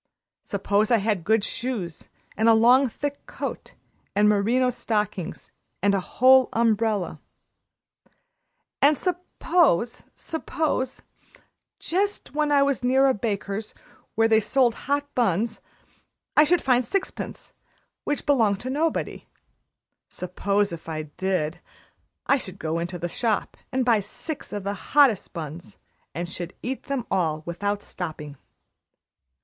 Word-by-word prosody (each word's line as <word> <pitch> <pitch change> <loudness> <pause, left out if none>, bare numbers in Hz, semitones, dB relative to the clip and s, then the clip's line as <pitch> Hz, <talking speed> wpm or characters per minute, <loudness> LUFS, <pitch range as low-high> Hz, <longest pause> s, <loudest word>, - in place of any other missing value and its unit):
"Suppose 200 +1 +1
I 235 - +5
had 205 -4 0
good 220 +2 +2
shoes 220 -9 -4 0.3
and 220 +1 +3
a 225 - +7
long, 250 +4 +5
thick 285 +4 -5
coat - - -6 0.4
and 210 +1 +4
merino 230 +5 +3
stockings 210 -7 -3 0.3
and 200 +1 +2
a 195 - +2
whole 260 +6 +5
umbrella. 220 -3 +1 1.6
And 290 +1 +5
suppose 345 - +1
suppose, 315 -5 -2 0.7
just 400 +4 -1
when 300 0 +1
I 280 -1 +5
was 280 -3 0
near 260 +2 +4
a 265 - +4
baker's 210 -1 -3 0.4
where 225 0 +4
they 220 -1 +5
sold 240 +2 +2 0.2
hot 285 0 +1
buns, 225 -2 0 0.7
I 300 - +7
should 350 +3 +2
find 255 -1 +3
sixpence 375 +11 -4 0.5
which 290 - -2
belonged 225 -9 +3
to 255 - -3
nobody. 315 +4 -1 0.8
Suppose, 200 +2 -1
if 165 0 -8
I 155 -1 -3
did, 180 -4 -1 0.7
I 280 - +4
should 190 -7 -7
go 160 -1 -2
into 175 +1 -4
the 175 +1 -3
shop 220 +4 -1 0.2
and 255 -1 0
buy 230 -3 +4
six 295 - -7
of 205 -2 -4
the 200 +1 -2
hottest 245 0 +3
buns, 165 0 -7 0.4
and 175 +1 -3
should 175 +1 -6
eat 260 +2 -4
them 275 -4 -2
all 160 -5 0
without 200 +4 -2
stopping." 150 -5 -6
225 Hz, 130 wpm, -25 LUFS, 190-265 Hz, 1.6 s, a